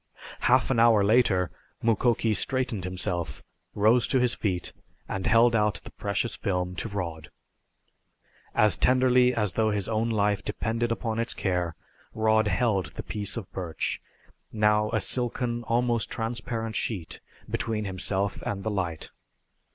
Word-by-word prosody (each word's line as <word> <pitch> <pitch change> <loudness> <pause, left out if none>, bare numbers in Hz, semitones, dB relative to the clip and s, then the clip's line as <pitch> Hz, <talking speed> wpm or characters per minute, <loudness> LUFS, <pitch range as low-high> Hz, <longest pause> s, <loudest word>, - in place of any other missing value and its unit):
Half 130 +1 +3
an 120 - +2
hour 115 -3 +5
later 100 -5 +3 0.3
Mukoki 115 0 +2
straightened 120 -2 -1
himself, 90 -2 -3 0.3
rose 110 +4 +4
to 130 - +2
his 125 -1 +3
feet 90 -4 -2 0.3
and 95 -1 -3
held 115 +1 +5
out 105 -6 +1
the - - -11
precious 100 +3 -2
film 90 -2 -2
to 115 - -3
Rod. 85 -6 -5 1.3
As 105 -1 +6
tenderly 125 0 +4
as 105 -5 0
though 110 +2 +2
his 105 -2 -1
own 115 +1 0
life 105 -2 +1
depended 115 +2 -2
upon 115 -1 -2
its 115 - -2
care, 90 -3 -1 0.4
Rod 110 0 +3
held 105 -6 +1
the - - -5
piece 105 +1 -4
of 105 -5 -7
birch, 90 -4 -3 0.5
now 105 0 +2
a 110 - 0
silken, 120 +1 0
almost 120 0 +1
transparent 115 -1 -3
sheet, 95 -8 -3 0.3
between 110 -2 -2
himself 95 +1 -2
and 100 -1 -4
the 110 - -1
light. 90 -6 -3
110 Hz, 145 wpm, -27 LUFS, 95-115 Hz, 1.3 s, As